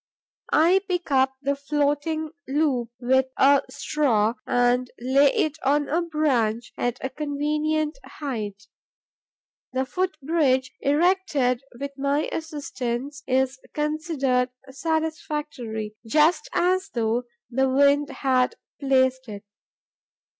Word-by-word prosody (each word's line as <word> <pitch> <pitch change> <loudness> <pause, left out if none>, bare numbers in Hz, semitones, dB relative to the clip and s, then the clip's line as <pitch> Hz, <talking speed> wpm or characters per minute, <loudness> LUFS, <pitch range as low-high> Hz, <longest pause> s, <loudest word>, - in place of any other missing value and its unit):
I 350 +5 +5
pick 355 -4 -2
up 265 0 +3
the 280 +1 +1
floating 295 +2 -1 0.2
loop 270 -4 +1
with 260 +1 +2
a 280 +1 +6
straw 230 -8 +1
and 245 +1 +2
lay 270 +3 +4
it 310 0 0
on 290 +2 +2
a 330 +4 +1
branch, 260 -9 0
at 245 0 -1
a - - -1
convenient 300 - -1
height. 215 -8 -5 1.1
The 260 +1 0
foot 360 +5 -2
bridge 270 -4 +1
erected 290 -5 +2 0.2
with 280 0 -4
my 280 +2 +1
assistance 280 -4 -4
is 265 +1 +1 0.2
considered 295 -5 0 0.2
satisfactory, 295 -8 -3
just 310 - +3
as 370 -1 +1
though 230 +1 0 0.3
the 265 +2 +2
wind 285 +2 +4
had 255 -2 +1 0.2
placed 260 -2 +2
it. 205 0 -7
280 Hz, 110 wpm, -24 LUFS, 255-305 Hz, 1.1 s, a